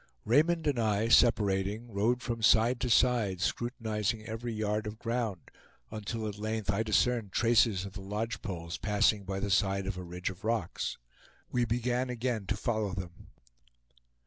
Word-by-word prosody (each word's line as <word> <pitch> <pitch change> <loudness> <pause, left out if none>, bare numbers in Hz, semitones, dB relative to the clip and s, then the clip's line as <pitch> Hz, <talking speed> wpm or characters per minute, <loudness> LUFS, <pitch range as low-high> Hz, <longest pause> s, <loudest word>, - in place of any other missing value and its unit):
Raymond 160 +7 +3
and 140 -5 +1
I 110 0 +1
separating, 105 0 +3
rode 115 +5 +1
from 115 -2 -3
side 115 +3 +4
to 125 - -1
side, 115 -6 +3
scrutinizing 110 0 -2
every 115 +1 -4
yard 105 0 -1
of 105 +1 -6
ground, 115 -5 -3 0.4
until 110 +1 -4
at 105 -1 -6
length 110 -1 -1
I 100 +2 0
discerned 110 -1 +1
traces 115 -5 +3
of 100 - -8
the 100 - -7
lodge 105 +4 -3
poles 85 -4 -5
passing 105 -1 +2
by 95 0 -3
the 100 0 -2
side 95 +1 +2
of 95 -1 -3
a - - -6
ridge 90 +1 -4
of 95 +2 -14
rocks. 115 +1 -2 0.5
We 120 -1 +2
began 125 +2 0
again 120 -4 -2
to 105 - -1
follow 110 -3 -1
them. 90 -3 -8
110 Hz, 165 wpm, -30 LUFS, 100-120 Hz, 0.5 s, side